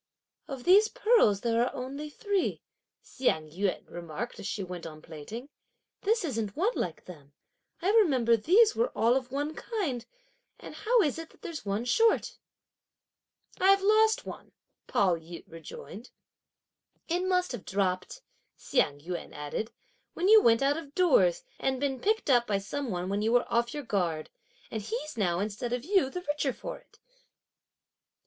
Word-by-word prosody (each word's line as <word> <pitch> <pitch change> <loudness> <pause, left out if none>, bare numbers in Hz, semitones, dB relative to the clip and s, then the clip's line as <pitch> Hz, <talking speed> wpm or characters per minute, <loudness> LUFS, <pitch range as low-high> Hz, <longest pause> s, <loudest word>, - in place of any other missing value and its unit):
"Of 270 -3 -6
these 405 - +6
pearls 445 - +3
there 230 0 +2
are 245 - -2
only 275 +4 -5
three," 400 +5 -1 0.4
Hsiang 160 - -1
yün 190 +3 -2
remarked 175 +7 -6
as - - -5
she 200 - -3
went 180 -2 -7
on 155 -1 -10
plaiting; 165 - -8 0.5
"this 435 -1 +1
isn't 225 -8 -3
one 405 +9 +2
like - - -4
them; 145 -5 -13 0.5
I 385 - +3
remember 270 - +4
these 410 - +4
were 475 +2 +1
all 230 +2 +4
of 255 -2 -2
one 290 +3 -2
kind, 320 - -3 0.6
and - - -10
how 465 -1 +2
is 295 0 -1
it 325 - -8
that - - -24
there's 310 -11 -6
one 205 +4 -1
short?" 450 - +2 1.2
"I've 390 +1 +5
lost 435 +2 +4
one," - - -9 0.3
Pao 185 -4 +2
yü 165 +1 -10
rejoined. 165 - -10 1.0
"It 350 +2 0
must 365 -1 +1
have 245 -6 -6
dropped," 190 - -2 0.3
Hsiang 145 - 0
yün 175 +3 -6
added, 150 +10 -4 0.4
"when 360 - 0
you 435 +1 +8
went 230 - +4
out 285 +2 +2
of 290 -3 -9
doors, - - +4 0.2
and 265 -1 0
been 270 -2 -1
picked 435 - 0
up 240 -2 +4
by 205 - +1
some 255 +7 -4
one 180 -2 -3
when 200 +2 -1
you 220 +2 +1
were 245 - +4
off 235 0 +2
your 295 - -4
guard; 175 -9 -1 0.4
and 220 - -3
he's 245 +8 -5
now, 180 -6 0
instead 210 +4 -3
of 245 +1 -2
you, 375 -7 +3
the 360 +6 -5
richer 295 -3 0
for - - -7
it." - - -26
250 Hz, 165 wpm, -29 LUFS, -, 1.2 s, you